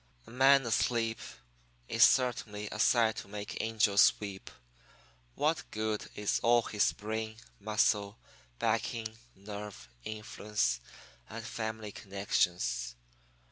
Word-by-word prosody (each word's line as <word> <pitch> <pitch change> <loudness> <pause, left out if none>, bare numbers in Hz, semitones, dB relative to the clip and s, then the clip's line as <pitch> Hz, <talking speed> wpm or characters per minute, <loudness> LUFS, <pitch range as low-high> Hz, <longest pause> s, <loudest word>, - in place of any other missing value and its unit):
"A - - -14
man 135 +1 +5
asleep 115 0 +1 0.7
is 115 0 +4
certainly 115 -5 +2
a 105 - -6
sight 115 -1 +4
to - - -6
make 105 +1 -5
angels 110 -2 +4
weep. 100 -2 -7 0.9
What 155 +2 0
good 110 0 -2
is 105 -1 0
all 120 0 +4
his 105 -1 +2
brain, 110 +1 -4 0.2
muscle, 105 0 +1 0.4
backing, 110 - -1 0.2
nerve, 100 +1 -8 0.2
influence, 105 - -2 0.5
and 115 +1 -7
family 110 -2 -4
connections? 90 - -1
110 Hz, 105 wpm, -32 LUFS, 105-115 Hz, 0.9 s, man